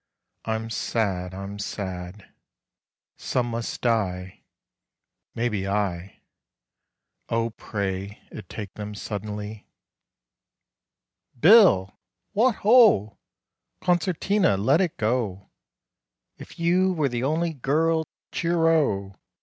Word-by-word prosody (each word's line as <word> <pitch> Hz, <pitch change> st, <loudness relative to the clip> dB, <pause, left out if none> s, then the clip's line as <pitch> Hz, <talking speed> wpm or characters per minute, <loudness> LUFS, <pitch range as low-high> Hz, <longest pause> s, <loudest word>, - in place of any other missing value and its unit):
I'm 110 Hz, 0 st, -3 dB
sad.... 95 Hz, -5 st, -2 dB
I'm 100 Hz, +1 st, -7 dB
sad: 95 Hz, -1 st, -6 dB, 0.8 s
Some 120 Hz, -2 st, -1 dB
must 115 Hz, 0 st, -4 dB
die 95 Hz, -6 st, -1 dB, 0.9 s
(Maybe 110 Hz, -5 st, -1 dB
I): 95 Hz, -2 st, -2 dB, 1.1 s
O 115 Hz, 0 st, 0 dB
pray 100 Hz, -2 st, -4 dB
it 105 Hz, -5 st, -10 dB
take 105 Hz, -3 st, -7 dB
them 105 Hz, 0 st, -7 dB
suddenly! 105 Hz, +1 st, -6 dB, 1.7 s
"Bill!" 175 Hz, -, +6 dB, 0.3 s
"Wot 230 Hz, +3 st, +3 dB
ho!" 215 Hz, -, +5 dB, 0.6 s
"Concertina: 180 Hz, -, +1 dB
let 135 Hz, -, +3 dB
it 175 Hz, -4 st, -1 dB
go 110 Hz, -4 st, -2 dB, 0.8 s
'If -, -, -13 dB
you 180 Hz, +3 st, +2 dB
were 155 Hz, -5 st, +1 dB
the 120 Hz, -1 st, -3 dB
Only 160 Hz, +4 st, 0 dB
Girl.'" 160 Hz, +4 st, +1 dB, 0.2 s
"Cheero!" 165 Hz, -, +1 dB
110 Hz, 90 wpm, -25 LUFS, 100-165 Hz, 1.7 s, Bill